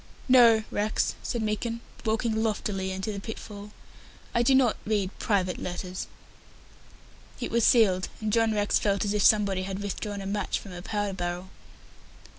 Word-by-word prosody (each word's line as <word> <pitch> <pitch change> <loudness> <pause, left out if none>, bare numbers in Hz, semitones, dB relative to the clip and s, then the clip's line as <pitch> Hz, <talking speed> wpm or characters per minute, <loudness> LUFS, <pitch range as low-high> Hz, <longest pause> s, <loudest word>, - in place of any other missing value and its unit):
"No, 235 -4 +6
Rex," 210 +1 0
said 235 -3 -2
Meekin, 225 +2 -2 0.2
walking 220 0 0
loftily 205 -3 -1
into 190 +3 -3
the 200 - -5
pitfall; 205 -1 -8 0.6
"I 235 - +3
do 265 +3 +4
not 260 -4 +4
read 205 -3 -1
private 185 -4 0
letters." 180 +1 -5 1.3
It 240 - -4
was 235 0 +2
sealed, 195 -7 +4
and 215 -1 -2
John 225 -1 +3
Rex 205 -1 +2
felt 200 -1 +1
as 205 - 0
if 210 - +1
somebody 200 -3 +4
had 190 0 -4
withdrawn 205 +1 -4
a - - -7
match 200 0 -1
from 195 - -10
a 175 -1 -7
powder 205 0 -2
barrel. 180 0 -4
205 Hz, 160 wpm, -27 LUFS, 190-220 Hz, 1.3 s, No